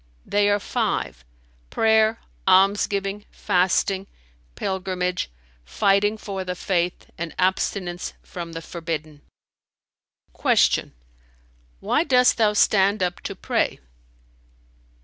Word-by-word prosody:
"They 205 Hz, 0 st, +2 dB
are 205 Hz, -, +3 dB
five, -, -, -2 dB, 0.5 s
prayer, 220 Hz, 0 st, +3 dB, 0.3 s
almsgiving, 195 Hz, +1 st, +2 dB
fasting, 190 Hz, 0 st, +1 dB, 0.5 s
pilgrimage, 185 Hz, -, -2 dB, 0.3 s
fighting 200 Hz, -, +2 dB
for 195 Hz, -3 st, -5 dB
the 180 Hz, 0 st, -4 dB
Faith 180 Hz, -1 st, -2 dB
and 170 Hz, -2 st, -5 dB
abstinence 185 Hz, -1 st, -1 dB
from 170 Hz, -2 st, -7 dB
the 165 Hz, 0 st, -6 dB
forbidden." 155 Hz, -4 st, -5 dB, 1.1 s
Q -, -, +2 dB, 0.9 s
"Why 310 Hz, -, +2 dB
dost 250 Hz, -5 st, +4 dB
thou 215 Hz, -2 st, +3 dB
stand 200 Hz, -1 st, +3 dB
up 180 Hz, 0 st, -2 dB
to -, -, -5 dB
pray?" -, -, -1 dB
190 Hz, 95 wpm, -23 LUFS, 180-205 Hz, 1.1 s, dost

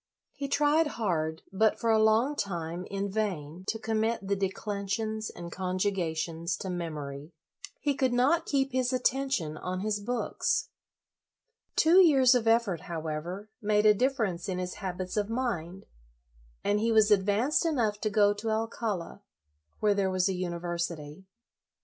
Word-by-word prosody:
He 280 Hz, -, -4 dB
tried 295 Hz, +3 st, +3 dB
hard, 160 Hz, -7 st, -1 dB
but, 215 Hz, +3 st, +2 dB
for 230 Hz, -, +2 dB
a 220 Hz, -1 st, +4 dB
long 225 Hz, +7 st, +3 dB
time, 175 Hz, -, -3 dB
in 200 Hz, 0 st, -3 dB
vain, 185 Hz, -5 st, -3 dB
to 225 Hz, -, 0 dB
com 220 Hz, 0 st, -1 dB
mit 220 Hz, -2 st, -1 dB
the 200 Hz, -, +1 dB
declensions 205 Hz, +2 st, -2 dB
and 170 Hz, -1 st, -9 dB
conjugations 180 Hz, -3 st, -2 dB
to 190 Hz, -, -5 dB
memory. 150 Hz, -3 st, -5 dB, 0.5 s
He 290 Hz, -2 st, +1 dB
could 260 Hz, -2 st, +1 dB
not 265 Hz, +8 st, +2 dB
keep 275 Hz, -1 st, +1 dB
his 255 Hz, 0 st, +1 dB
atten 265 Hz, +2 st, +1 dB
tion 155 Hz, -, -2 dB
on 185 Hz, +2 st, -4 dB
his 210 Hz, 0 st, -1 dB
books. 235 Hz, +4 st, -1 dB, 1.1 s
Two 335 Hz, +4 st, +6 dB
years 270 Hz, -8 st, +6 dB
of 240 Hz, -3 st, +1 dB
effort, 225 Hz, -6 st, +3 dB
however, 170 Hz, +5 st, -5 dB
made 210 Hz, 0 st, +2 dB
a 210 Hz, -, +8 dB
difference 210 Hz, -7 st, 0 dB
in 185 Hz, -, -2 dB
his 180 Hz, 0 st, -3 dB
habits 185 Hz, 0 st, -4 dB
of 210 Hz, 0 st, 0 dB
mind, 195 Hz, -7 st, -3 dB, 0.8 s
and 205 Hz, +1 st, +2 dB
he 230 Hz, +2 st, +1 dB
was 220 Hz, -1 st, +5 dB
advanced 210 Hz, -, +3 dB
enough 235 Hz, -11 st, 0 dB
to 215 Hz, -, 0 dB
go 205 Hz, 0 st, +4 dB
to 210 Hz, +2 st, -4 dB
Alcala, 220 Hz, -4 st, -2 dB, 0.6 s
where 210 Hz, -1 st, +4 dB
there 200 Hz, -1 st, +1 dB
was 185 Hz, 0 st, +1 dB
a 190 Hz, -, 0 dB
university. 170 Hz, -2 st, -4 dB
205 Hz, 155 wpm, -29 LUFS, 180-230 Hz, 1.1 s, a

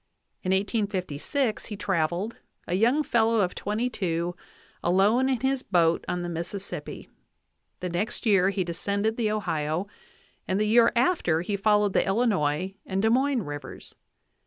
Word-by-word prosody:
In 185 Hz, -, -3 dB
1856 205 Hz, -, -1 dB
he 210 Hz, -, -6 dB
traveled, 190 Hz, +2 st, -1 dB, 0.3 s
a -, -, -3 dB
young 240 Hz, +10 st, +3 dB
fellow 225 Hz, -3 st, +2 dB
of 180 Hz, -2 st, 0 dB
twenty 215 Hz, +4 st, -2 dB
two, 175 Hz, -6 st, -2 dB, 0.5 s
alone 205 Hz, +9 st, +3 dB
in 255 Hz, -3 st, 0 dB
his 265 Hz, 0 st, +1 dB
boat 170 Hz, -6 st, +2 dB
on 180 Hz, 0 st, -2 dB
the -, -, -3 dB
Mississippi; 175 Hz, +4 st, -6 dB, 0.7 s
the 180 Hz, -, -2 dB
next 190 Hz, +9 st, -3 dB
year 195 Hz, -4 st, +4 dB
he 195 Hz, -1 st, -1 dB
descended 200 Hz, +5 st, -1 dB
the 230 Hz, -3 st, 0 dB
Ohio, 170 Hz, -5 st, -1 dB, 0.6 s
and 190 Hz, +2 st, 0 dB
the 215 Hz, -, +2 dB
year 230 Hz, +2 st, +5 dB
after 235 Hz, -, +2 dB
he 200 Hz, +3 st, -2 dB
followed 210 Hz, 0 st, +2 dB
the -, -, +3 dB
Illinois 190 Hz, -5 st, +1 dB
and 190 Hz, +1 st, -2 dB
Des 220 Hz, -, +4 dB
Moines 260 Hz, -1 st, +2 dB
Rivers. 145 Hz, -3 st, -8 dB
200 Hz, 150 wpm, -26 LUFS, 175-225 Hz, 0.7 s, year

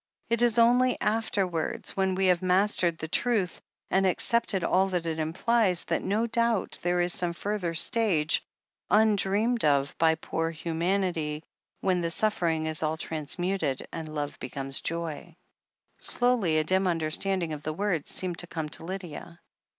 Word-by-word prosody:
It 235 Hz, 0 st, +2 dB
is 240 Hz, -1 st, +4 dB
only 245 Hz, +2 st, +4 dB
after 215 Hz, -2 st, 0 dB
wards, 165 Hz, -3 st, -3 dB
when 190 Hz, -1 st, +1 dB
we 190 Hz, +1 st, +1 dB
have 180 Hz, -2 st, +3 dB
mastered 185 Hz, -2 st, +2 dB
that 160 Hz, 0 st, -7 dB
truth, 220 Hz, -7 st, 0 dB, 0.3 s
and 190 Hz, 0 st, +3 dB
accepted 200 Hz, 0 st, +1 dB
all 190 Hz, +3 st, +3 dB
that 180 Hz, -3 st, -2 dB
it 160 Hz, -1 st, -2 dB
implies, 185 Hz, +4 st, +1 dB
that -, -, -1 dB
no 210 Hz, +5 st, 0 dB
doubt 230 Hz, -2 st, 0 dB
there 175 Hz, 0 st, +1 dB
is 175 Hz, 0 st, +1 dB
some 175 Hz, -1 st, 0 dB
further 185 Hz, -2 st, -3 dB
stage, 175 Hz, -6 st, +2 dB, 0.5 s
undreamed 215 Hz, +2 st, +2 dB
of 140 Hz, -1 st, +2 dB
by 160 Hz, -1 st, +4 dB
poor 165 Hz, 0 st, -2 dB
humanity, 165 Hz, -1 st, -1 dB, 0.4 s
when 185 Hz, -2 st, +1 dB
the 170 Hz, -, -1 dB
suf 215 Hz, +6 st, +1 dB
fering 160 Hz, -2 st, 0 dB
is 155 Hz, 0 st, -1 dB
all 155 Hz, 0 st, -1 dB
transmuted, 160 Hz, -1 st, -2 dB
and 155 Hz, -2 st, -6 dB
love 145 Hz, -1 st, -4 dB
becomes 135 Hz, -1 st, -4 dB
joy." 165 Hz, 0 st, -4 dB, 0.6 s
Slowly 240 Hz, -10 st, +2 dB
a 155 Hz, -, +3 dB
dim 190 Hz, +4 st, +2 dB
understanding 170 Hz, +1 st, -1 dB
of 150 Hz, -, -6 dB
the 155 Hz, +1 st, -3 dB
words 180 Hz, -3 st, -1 dB
seemed 180 Hz, -2 st, -3 dB
to 175 Hz, -, 0 dB
come 160 Hz, -3 st, -4 dB
to -, -, -5 dB
Lydia. 175 Hz, -2 st, -7 dB
180 Hz, 160 wpm, -28 LUFS, 160-200 Hz, 0.6 s, is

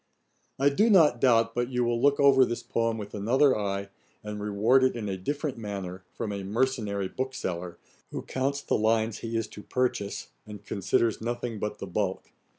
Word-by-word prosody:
I 140 Hz, +2 st, +4 dB
do 210 Hz, +11 st, +3 dB
not 160 Hz, -, +5 dB
doubt 115 Hz, -3 st, +4 dB
but 120 Hz, +1 st, -1 dB
you 125 Hz, -1 st, 0 dB
will 120 Hz, 0 st, 0 dB
look 140 Hz, +1 st, +4 dB
over 140 Hz, -2 st, +6 dB
this 120 Hz, -2 st, -2 dB
poem 115 Hz, -1 st, 0 dB
with 105 Hz, -2 st, -7 dB
another 130 Hz, +7 st, +3 dB
eye, 100 Hz, -1 st, -2 dB, 0.3 s
and 105 Hz, 0 st, -5 dB
reward 105 Hz, +6 st, +3 dB
it 130 Hz, -, +2 dB
in 110 Hz, -3 st, -4 dB
a 95 Hz, -, -2 dB
different 140 Hz, -, -3 dB
manner, 95 Hz, -4 st, -5 dB
from 105 Hz, -, -4 dB
a 100 Hz, -1 st, -4 dB
mercenary 105 Hz, -2 st, -1 dB
bookseller, 90 Hz, -8 st, -4 dB, 0.3 s
who -, -, -5 dB
counts 140 Hz, +2 st, -1 dB
the -, -, 0 dB
lines 110 Hz, 0 st, +1 dB
he 115 Hz, 0 st, -3 dB
is 115 Hz, -, -1 dB
to 105 Hz, -, -10 dB
purchase, 120 Hz, -4 st, -2 dB, 0.2 s
and 105 Hz, -1 st, -10 dB
considers 100 Hz, +3 st, 0 dB
nothing 120 Hz, -1 st, -3 dB
but 105 Hz, 0 st, -3 dB
the -, -, -6 dB
bulk. 95 Hz, 0 st, -3 dB
115 Hz, 185 wpm, -28 LUFS, 100-130 Hz, 0.3 s, over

